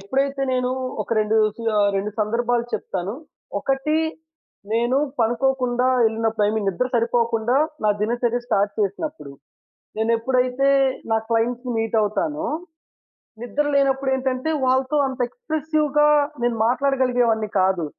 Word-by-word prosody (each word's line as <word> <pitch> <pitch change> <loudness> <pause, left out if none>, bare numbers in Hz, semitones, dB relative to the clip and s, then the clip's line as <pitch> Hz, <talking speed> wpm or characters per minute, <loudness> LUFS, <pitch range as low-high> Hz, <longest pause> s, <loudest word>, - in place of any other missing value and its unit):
ఎప్పుడైతే 275 +7 -1
నేను 250 0 0 0.3
ఒక - - -16
2 215 +1 +1 0.2
సు 230 - -8 0.2
ఆహ్, 205 0 +3
2 205 +2 -2
సందర్భాలు 235 +2 0
చెప్తాను. 190 +4 -3 0.5
ఒకటి 270 +3 0 0.8
నేను 240 +3 +1 0.2
పనుకోకుండా 250 +1 +1 0.2
ఎళ్ళినప్పుడు 220 -1 0
ఇ - - 0
మీన్ 215 -2 -1
నిద్ర 195 +7 0
సరిపోకుండా 235 +1 +1 0.3
నా - - +4
దినచర్య 240 +2 0
స్టార్ట్ 205 -3 +1
చేసినప్పుడు. 205 - -3 0.7
నేనెప్పుడైతే 250 +4 +1 0.4
నా 225 - +4
క్లయింట్స్‌ని 240 +2 0
మీట్ 225 0 -1
అవుతానో, 300 +9 -1 1.0
నిద్ర 285 +5 -1
లేనప్పుడేంటంటే 265 0 +1 0.2
వాళ్ళతో 260 +3 +2
అంత 260 0 -6
ఎక్స్ప్రెసివ్‌గా 310 - 0 0.4
నేను 240 -1 +1
మాట్లాడగలిగే 255 -1 +1
వాడిని 220 -1 0
కాదు. 185 -3 +1
245 Hz, 115 wpm, -22 LUFS, 225-265 Hz, 1.0 s, నా